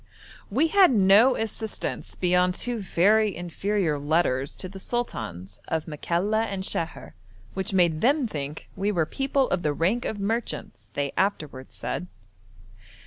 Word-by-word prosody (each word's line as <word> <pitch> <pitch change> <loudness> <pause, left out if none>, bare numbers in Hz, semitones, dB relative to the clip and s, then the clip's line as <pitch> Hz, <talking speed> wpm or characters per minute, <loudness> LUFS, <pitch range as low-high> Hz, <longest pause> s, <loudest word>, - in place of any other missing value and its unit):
We 280 +10 +2
had 390 +1 +6
no 215 +3 +6
assistance 220 0 -3
beyond 180 0 +2
two 245 -1 -2
very 205 +2 +3
inferior 175 -2 -1
letters 145 -3 +1
to 185 - -5
the 190 +1 -10
sultans 110 - -4
of 160 -1 -1
Makalla 180 +8 0
and 195 -3 -4
Sheher, 165 -3 -3 0.4
which 190 -1 -3
made 170 -4 +2
them 275 +2 +3
think 150 -5 -6
we 200 +2 0
were 170 -5 +1
'people 270 - 0
of 180 - 0
the 150 -3 0
rank 190 +11 0
of 210 - -3
merchants,' 225 +4 -3
they 140 -1 -1
afterwards 150 -9 -2
said. 90 - -4
190 Hz, 140 wpm, -26 LUFS, 160-220 Hz, 0.4 s, had